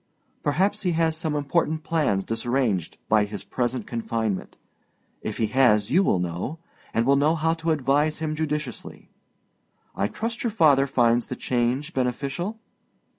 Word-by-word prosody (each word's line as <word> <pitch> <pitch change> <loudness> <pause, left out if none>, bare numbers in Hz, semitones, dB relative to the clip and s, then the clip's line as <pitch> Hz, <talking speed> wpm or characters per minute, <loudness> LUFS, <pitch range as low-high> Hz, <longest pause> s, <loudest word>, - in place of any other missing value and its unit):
Perhaps 195 +8 +1
he 180 -4 0
has 160 -1 +1
some 160 -2 -2
important 155 +2 0
plans 150 -14 +1
disarranged 115 - -1
by 110 -1 +4
his 105 -1 -7
present 125 0 -2
confinement. 115 -4 -3 0.6
If 110 - -4
he 115 - +2
has 105 -6 +4
you 180 +7 +5
will 190 - +2
know, 90 - -3 0.3
and 115 - +1
will 140 +2 +5
know 150 +3 +3
how 160 0 +1
to 165 0 -3
advise 150 +1 +2
him 155 -1 -2
judiciously. 150 -4 -4 0.8
I 100 - +1
trust 230 - -4
your 235 - +1
father 150 -9 +4
finds 120 -3 +2
the 125 - -4
change 125 +8 -1
beneficial? 140 - -2
140 Hz, 150 wpm, -25 LUFS, 120-160 Hz, 0.8 s, you